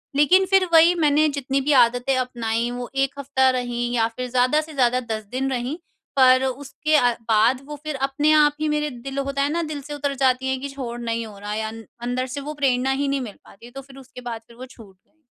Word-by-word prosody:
लेकिन 360 +7 +5
फिर 385 -1 +5
वही 330 +2 +7
मैंने 305 -2 +3
जितनी 275 -1 -2
भी 290 +3 0
आदतें 245 +3 +1
अपनाई 235 -2 -2
वो 245 0 -6
1 275 +1 -1
हफ़्ता 265 -1 +2
रही 245 -1 -3
या 225 -1 +2
फिर 250 0 -4
ज़्यादा 255 +4 +2
से 310 0 -11
ज़्यादा 250 -2 +2
10 215 0 -3
दिन 265 +2 -1
रहीं 255 +4 -3 0.4
पर 255 0 +6
उसके 285 +4 -2
अ, 245 -4 +4 0.2
बाद 225 +4 +3
वो 300 +1 -7
फिर 305 -1 -4
अपने 275 +3 +1
आप 300 -1 +5
ही 310 - +1
मेरे 300 0 0
दिल 270 +1 -8
होता 275 0 -2
है 280 - +1
ना 340 +2 -1
दिल 290 - -6
से - - -4
उतर 285 -1 -2
जाती 260 0 +2
है 265 - 0
कि 280 +2 -6
छोड़ 250 -4 -6
नहीं 230 -1 -2
हो 210 -2 -11
रहा 205 +1 -5
या 220 0 -3
न 225 0 -10 0.2
अंदर 255 +1 -2
से - - -3
वो - - -4
प्रेरणा 260 0 +2
ही 280 +1 -1
नहीं 275 0 -1
मिल 220 -5 -7
पाती 200 - -16
है 240 - -13
तो 270 +2 -8
फिर 270 0 -16
उसके 265 -1 -12
बाद 225 -1 -6
फिर 235 - -17
वो 255 - -8
छूट 225 -7 -16
गई। 315 +11 -42
265 Hz, 245 wpm, -22 LUFS, 245-285 Hz, 0.4 s, वही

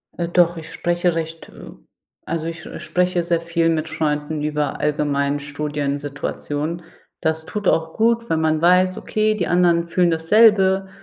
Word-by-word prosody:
Äh, 170 - -2
doch, 175 -1 +3
ich 160 -1 -9
spreche 175 0 0
recht, 165 0 -5
äh - - -12 0.6
also 165 0 -2
ich 165 +1 -6 0.2
spreche 180 -1 0
sehr 170 0 +1
viel 170 0 0
mit 160 -1 -1
Freunden 155 -1 -2
über 150 -1 -2
allgemeinen 145 -1 0
Studiensituationen. 145 +2 -4 0.4
Das 160 0 -1
tut 210 0 -1
auch 160 0 0
gut, 230 +1 +1
wenn 160 -1 +1
man 155 -1 +1
weiß, 180 +2 +4
okay, 215 0 0
die 195 -5 -2
anderen 170 -1 +2
fühlen 175 0 +2
dasselbe 190 +2 +4
165 Hz, 150 wpm, -21 LUFS, 150-180 Hz, 0.6 s, weiß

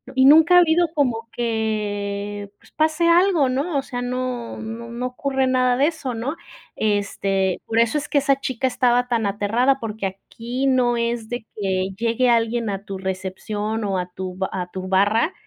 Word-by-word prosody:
y 260 0 +5
nunca 320 +5 +7
ha - - +9
habido 345 0 +3
como 240 -7 0
que, 205 -3 -3
pues - - -22
pase 315 +2 +2
algo, 340 -4 +4
¿no?, 280 +5 -1
o - - +1
sea, 245 -2 -5
no, 250 -1 -3
no, 225 +1 -7
no 240 +2 -4
ocurre 265 +1 -1
nada 255 -1 +2
de 280 +3 +4
eso, 310 -6 -3
¿no?, 240 +7 -3 0.4
este, 195 -3 0
por 225 0 0
eso 235 +5 +3
es 295 - -4
que - - +1
esa 275 -1 +3
chica 260 -1 -1
estaba 245 -1 +2
tan 235 -3 0
aterrada 225 +7 +1
porque 220 -4 -3
aquí 235 +7 -5
no 250 -2 +2
es 235 -1 -2
de 240 -2 -4
que 190 -2 -1
llegue 235 +3 +1
alguien 230 -1 +1
a 195 -1 -4
tu 195 -2 -6
recepción 190 +3 -3
o 195 -2 -1
a 180 -1 -2
tu 185 0 -5
ba 190 0 -2
a 180 -1 -4
tu 185 0 -6
barra 205 - +2
235 Hz, 185 wpm, -22 LUFS, 205-260 Hz, 0.4 s, ha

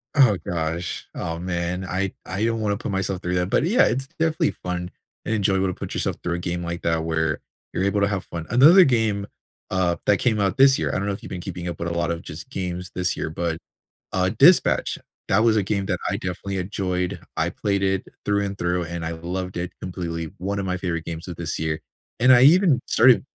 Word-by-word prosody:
Oh, 125 -9 +6
gosh. 85 0 -3
Oh, 85 -1 -4
man. 90 +1 -2
I 95 +1 -2
I 95 +3 -3
don't 115 -1 0
wanna 105 -1 0
put 105 - -4
myself 95 -1 -2
through 90 +1 -1
that. 90 +1 0
But, - - +2
yeah, 195 +10 +4
it's 135 +3 -1
definitely 160 0 +2
fun 90 -1 -4 0.4
and 110 - 0
enjoyable 95 -2 +2
to 90 - -1
put - - -6
yourself - - -1
through 90 - -1
a - - -3
game 85 0 -3
like 85 0 -4
that 80 -1 0
where 80 -1 0 0.3
you're 90 - 0
able 100 +1 +1
to 100 - +4
have 95 -2 -2
fun. 85 -1 -6
Another 155 +10 +8
game, 110 - +1 0.4
uh, 90 -2 +1
that 105 - +5
came 110 -2 +1
out 100 -1 +1
this 135 0 +6
year - - 0
I - - -3
don't 100 - -2
know 100 - -1
if 95 - -7
you've - - -9
been 90 - -5
keeping 90 -1 -6
up 85 - -4
with 85 - -2
a - - -3
lot 85 0 0
of 85 0 -3
just 75 +1 -9
games 90 -1 -4
this 90 -1 0
year, - - -3
but, 80 0 -2 0.6
uh, - - +2
Dispatch, - - +5 0.3
that - - +3
was 115 -1 +4
a 105 - +3
game 100 0 -1
that - - -1
I - - 0
definitely 95 +2 -4
enjoyed. 90 -1 -2 0.2
I - - +1
played 100 -1 -1
it 95 -1 0 0.2
through 100 0 +2
and 100 0 -4
through, 90 0 0
and 85 0 -5
I 80 - -2
loved 90 +3 -5
it 90 +1 -3
completely. 85 -3 -4
One 100 +3 -3
of 100 - -2
my 90 0 -1
favorite 90 -3 -3
games 85 +1 -6
of 90 - -6
this 85 -1 -4
year. 80 0 -2 0.4
And 125 +2 +6
I 125 -1 +7
even 160 0 +6
started 125 0 +5
95 Hz, 235 wpm, -23 LUFS, 85-100 Hz, 0.6 s, Another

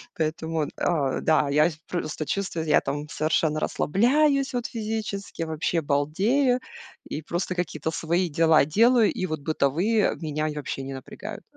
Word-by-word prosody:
Поэтому, 160 -1 -1
э, 140 -6 -1
да, 155 -2 +3
я 150 +4 +4 0.2
просто 155 -3 -3
чувствую, 180 -4 -2
я 150 - +5
там 145 +2 -4
совершенно 155 0 +1
расслабляюсь, 275 - +2
вот, 245 -1 -2
физически, 215 -5 -4
вообще 165 +1 -1
балдею, 195 - +2 0.5
и 155 - -3
просто 175 +3 -3
какие-то 160 -3 -2
свои 170 +2 0
дела 160 -1 +4
делаю. 230 - +4
И 185 - -2
вот 155 -4 -4
бытовые 165 +9 +1
меня 155 0 -2
я 150 - -4
вообще 135 -2 -4
не 135 0 -6
напрягают. 130 - -8
160 Hz, 145 wpm, -25 LUFS, 150-200 Hz, 0.5 s, я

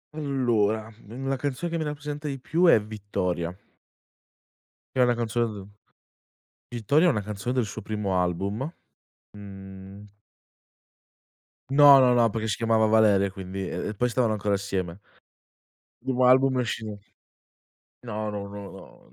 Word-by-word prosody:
Allora, 115 -7 0 0.2
una 135 +3 -3
canzone 145 +5 -3
che 170 - -1
mi - - -1
rappresenta 150 0 -5
di 140 -2 -3
più 165 +7 +1
è 165 - +7
"Vittoria" 95 -5 -3 1.4
che 130 - -1
è - - +7
una 120 -1 +3
canzone 120 0 0
d 100 -2 -9 1.0
"Vittoria" 140 - +2
è - - +5
una 110 -9 0
canzone 105 +4 -4
del 130 -1 +1
suo 110 - -7
primo 100 -3 -1
album, 100 - -2 0.6
mhmm 95 0 -11 1.7
No, 140 0 +8
no, 125 -1 +5
no, 120 -1 +4
perché 110 +1 -3
si 105 - -1
chiamava 115 -1 +2
Valeria 105 -3 +4
e - - -5
quindi, 95 0 -6
e - - -4
e - - -4
poi 125 +4 0
stavano 120 -2 +1
ancora 105 -1 -1
assieme. 95 -2 -4 1.1
Il - - -3
primo 130 -1 +2
album 130 +1 +4
esce 110 -3 -4 1.1
no, 110 -1 -3
no, 100 -1 -5
no, 100 -9 -12
110 Hz, 145 wpm, -26 LUFS, 100-130 Hz, 1.7 s, No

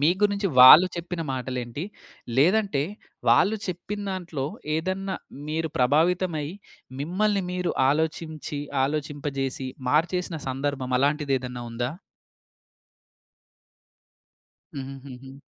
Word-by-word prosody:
మీ 150 +4 +5
గురించి 205 -1 +2
వాళ్ళు 140 +8 +11
చెప్పిన 170 0 -4
మాటలేంటి? 125 0 -4 0.5
లేదంటే 185 0 +3 0.5
వాళ్ళు 190 - +5
చెప్పిందాంట్లో, 185 -4 -4 0.3
ఏదన్నా 190 +3 -2 0.3
మీరు 160 +1 -1
ప్రభావితమై, 160 +4 +2 0.5
మిమ్మల్ని 195 +6 +1
మీరు 180 -1 -1 0.2
ఆలోచించి, 155 -1 -2 0.2
ఆలోచింపజేసి 140 -2 -3 0.2
మార్చేసిన 170 +3 +1
సందర్భం 135 -1 -2
అలాంటిదేదన్నా 135 -4 0
ఉందా? 120 +2 -2 2.9
హుహుహుహు. 135 -1 -9
150 Hz, 75 wpm, -25 LUFS, 135-180 Hz, 2.9 s, వాళ్ళు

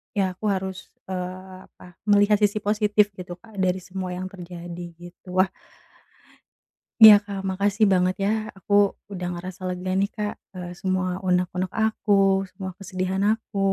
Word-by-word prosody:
ya 195 -2 +1
aku 215 - -4
harus, 190 -1 -4 0.2
eee, 185 0 -6
apa, 180 -1 -17
melihat 205 0 +5
sisi 210 0 +2
positif 210 0 +2
gitu 180 -1 -7
Kak, 220 -2 -12
dari 185 0 +1
semua 185 0 -5
yang 185 +1 -4
terjadi 175 -1 -8
gitu, 175 +1 -11
wah 190 0 0 1.5
iya 215 -1 +13
Kak 195 -2 -5
makasih 200 +3 +2
banget 185 0 +2
ya, 200 - +2 0.3
aku 195 +2 -4 0.3
udah 185 -3 -5
ngerasa 180 +1 -7
lega 180 +1 -4
nih 200 +2 +1
Kak, 210 -1 -2 0.2
eee, 180 -2 -7
semua 185 0 -1 0.2
unek-unek 180 0 0
aku, 200 -3 +2
semua 190 -2 -6
kesedihan 185 0 -2
aku, 220 -2 -4
190 Hz, 150 wpm, -24 LUFS, 180-205 Hz, 1.5 s, iya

